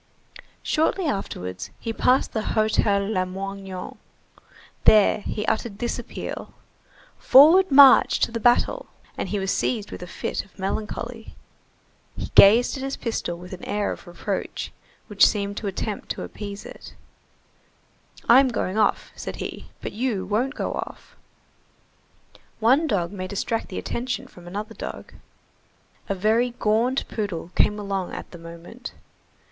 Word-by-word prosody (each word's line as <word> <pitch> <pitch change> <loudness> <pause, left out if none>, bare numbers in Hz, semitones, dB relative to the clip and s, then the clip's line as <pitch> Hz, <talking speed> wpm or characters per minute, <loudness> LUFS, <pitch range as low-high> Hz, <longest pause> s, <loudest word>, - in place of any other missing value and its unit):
Shortly 330 +4 +1
afterwards, 90 - -4
he 225 - -4
passed 255 +3 +2
the 220 - 0
Hotel 215 -2 +1
Lamoignon. 195 -1 -4 0.9
There 210 -1 +6
he 210 +1 -4
uttered 220 -2 -1
this 240 +2 -2
appeal:— 240 - -7 0.6
"Forward 330 +8 +7
march 275 -1 +7
to - - +2
the 230 - -3
battle!" 245 - +2 0.3
And - - -4
he 210 - -1
was 195 0 -1
seized 215 -5 -1
with - - -8
a 180 - -7
fit - - -4
of 195 - -24
melancholy. 220 +4 -4 0.8
He - - -5
gazed 225 +8 +7
at - - -6
his 270 0 -3
pistol 220 -7 -3
with 180 +2 -10
an 185 - -9
air 205 0 -1
of - - -8
reproach 175 +3 -4 0.3
which 205 -2 +2
seemed 200 -1 +2
an 210 - -5
attempt 200 +2 -4
to - - -7
appease 205 -1 -7
it:— - - -11 1.3
"I'm 260 +3 +7
going 220 -4 -2
off," 210 - +1
said - - -6
he, - - -7
"but - - -5
you 215 -4 -2
won't 235 +8 -1
go - - -2
off!" - - -7 1.4
One 260 +8 +4
dog 180 - 0
may 185 -2 -5
distract 225 +4 -2
the - - -6
attention 245 +1 -3
from 175 -1 -15
another 205 +4 -5
dog.45 - - -8 1.0
A 200 - 0
very 220 +6 +2
gaunt 230 +5 +1
poodle 190 -6 -4
came 210 - +2
along 195 -3 -3
at - - -8
the 175 - -10
moment. 170 +9 -10
210 Hz, 145 wpm, -24 LUFS, 195-240 Hz, 1.4 s, Forward